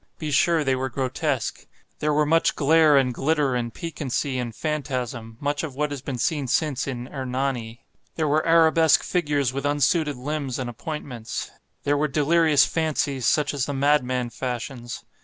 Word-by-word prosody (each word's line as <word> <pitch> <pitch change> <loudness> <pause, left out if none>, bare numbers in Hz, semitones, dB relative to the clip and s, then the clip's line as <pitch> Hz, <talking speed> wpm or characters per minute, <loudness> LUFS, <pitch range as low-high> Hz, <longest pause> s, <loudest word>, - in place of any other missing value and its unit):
Be 155 -2 -4
sure 160 +2 +3
they 135 -2 +1
were 130 +1 -2
grotesque. 135 +1 -2 0.3
There 150 - +1
were 150 0 +3
much 165 +2 +2
glare 155 0 +5
and 130 -2 +2
glitter 145 +1 +1
and 120 -1 -2
piquancy 145 -5 -3
and 120 -3 -4
phantasm—much 135 -2 -3
of 150 -5 -6
what 150 +1 -1
has 140 -2 -5
been 135 -2 -4
since 140 0 0
seen 150 -2 +1
in 125 -2 -4
"Hernani." 130 -3 -3 0.3
There 160 -2 0
were 150 +2 +2
arabesque 165 -1 +5
figures 145 -7 0
with 140 +1 -3
unsuited 145 +1 +1
limbs 140 -1 -3
and 125 -2 -3
appointments. 125 -3 -6 0.3
There 145 0 +2
were 150 +1 +1
delirious 155 +1 +4
fancies 145 -5 -1
such 150 -1 +2
as 140 -3 -1
the 145 - -3
madman 130 -3 +1
fashions. 120 -1 -5
140 Hz, 160 wpm, -24 LUFS, 130-150 Hz, 0.3 s, glare